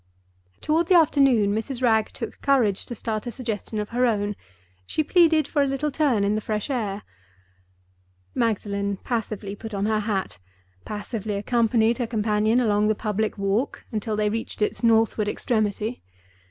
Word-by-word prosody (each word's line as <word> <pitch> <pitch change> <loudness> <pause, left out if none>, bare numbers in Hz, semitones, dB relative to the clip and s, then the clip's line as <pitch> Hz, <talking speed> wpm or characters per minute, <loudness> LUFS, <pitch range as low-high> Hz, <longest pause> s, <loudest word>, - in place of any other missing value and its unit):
Toward 320 +2 +1
the 365 - +5
afternoon 270 -10 +4
Mrs. 240 +4 -3
Wragge 220 -3 +3
took 230 - -7
courage 240 -8 +2
to 240 - -5
start 220 +1 -3
a - - -3
suggestion 225 -3 -4
of 210 0 -3
her 245 +1 +2
own—she 95 - -4
pleaded 325 -2 +4
for 290 - +1
a 280 - +2
little 275 +2 -1
turn 265 -9 +2
in 200 +1 +2
the 215 - -1
fresh 215 +5 -3
air. 210 -5 -2 1.3
Magdalen 200 -3 -1
passively 215 -4 -3
put 220 0 -7
on 200 +1 -1
her 215 0 +1
hat; 205 - -2 0.5
passively 210 0 -4
accompanied 230 +2 +2
her 240 - -1
companion 215 +1 +1
along 210 -3 +2
the 215 - +2
public 215 0 -2
walk, 200 +6 -1
until 215 -1 -2
they 210 0 +1
reached 225 -1 -3
its - - -2
northward 225 -2 +3
extremity. 215 +1 -1
220 Hz, 155 wpm, -24 LUFS, 205-245 Hz, 1.3 s, the